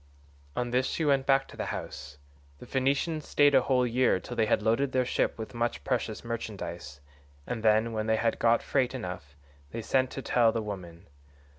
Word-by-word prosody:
"On 120 -1 -2
this 130 +1 +2
she 160 - -1
went 140 -2 +2
back 135 0 +3
to - - -13
the - - -4
house. 70 - -6 0.4
The - - -11
Phoenicians 140 +4 0
stayed 145 -1 +4
a 135 - +6
whole 125 -1 +2
year 125 -4 +2
till - - -8
they 110 - +2
had 105 - +2
loaded 125 +5 +1
their 130 -1 +2
ship - - 0
with 110 +1 -7
much 120 0 -2
precious 120 -4 -2
merchandise, 85 - -6 0.4
and 120 -2 -4
then, 110 +1 +3
when 110 0 -2
they 110 - +3
had 115 0 0
got 115 0 +3
freight 130 0 0
enough, 90 - -6 0.3
they 115 +8 -6
sent 130 +2 +2
to 135 - -5
tell 115 -2 +3
the 115 -1 -2
woman. 90 -4 -7
115 Hz, 195 wpm, -29 LUFS, 110-130 Hz, 0.4 s, a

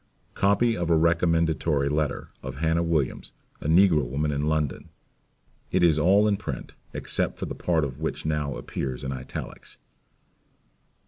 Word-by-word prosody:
Copy 110 +4 +2
of 85 -4 -2
a 85 - +5
Recommendatory 80 -3 +2
Letter 75 0 -1
of 65 0 -6
Hannah 80 +3 +1
Williams, 80 -6 -1 0.3
a - - -4
Negro 80 -2 +5
Woman, 70 +5 -1
in 70 +1 -1
London. 75 -3 -1 0.8
It 95 -1 +1
is 80 -3 +4
all 100 +6 +4
in 100 -1 +2
print, 70 - -6 0.2
except - - -1
the - - -4
part 85 -3 0
of 70 -2 -4
it - - -15
which 80 - -3
now 75 -3 -1
appears 65 -2 -4
in 70 - -3
Italics. 65 -1 -7
80 Hz, 150 wpm, -26 LUFS, 70-85 Hz, 0.8 s, a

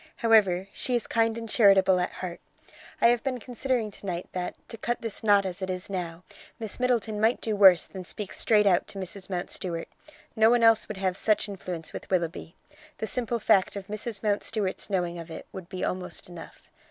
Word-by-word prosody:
However, 200 -5 +3
she 250 - -2
is 235 - 0
kind 225 0 +1
and 230 0 -6
charitable 195 -4 +5
at 180 - 0
heart. 180 -2 -6 0.6
I 235 - +6
have 240 -1 +2
been 255 -2 -2
considering 245 -2 -2
to 200 - -13
night 175 -1 -3
that, 180 -1 -4
to - - -6
cut 240 +2 -3
this 225 -2 -5
knot 205 -2 +5
as 185 +1 -5
it 190 - -3
is 185 +1 -3
now, 175 -2 -4 0.3
Miss 220 0 -6
Middleton 230 -4 0
might 225 +3 +3
do 220 -2 -1
worse 190 -4 +7
than 190 -1 -8
speak 200 +2 -6
straight 210 -2 +3
out 185 -3 +3
to - - -9
Mrs. 190 +1 -4
Mountstuart. 175 -2 -3 0.5
No 220 0 +5
one 240 0 +3
else 225 -1 +5
would 215 - -6
have 190 -1 0
such 210 +1 +2
influence 180 -5 -6
with - - -8
Willoughby. 170 -2 -2 0.4
The - - -3
simple 235 0 -1
fact 210 -4 +3
of 200 -1 -6
Mrs. 210 +1 -5
Mountstuart's 205 -1 -1
knowing 175 -3 -1
of 165 0 -9
it 160 - -8
would 185 -2 -9
be 185 - -3
almost 185 0 -4
enough. 175 -2 -11
200 Hz, 200 wpm, -27 LUFS, 185-225 Hz, 0.6 s, worse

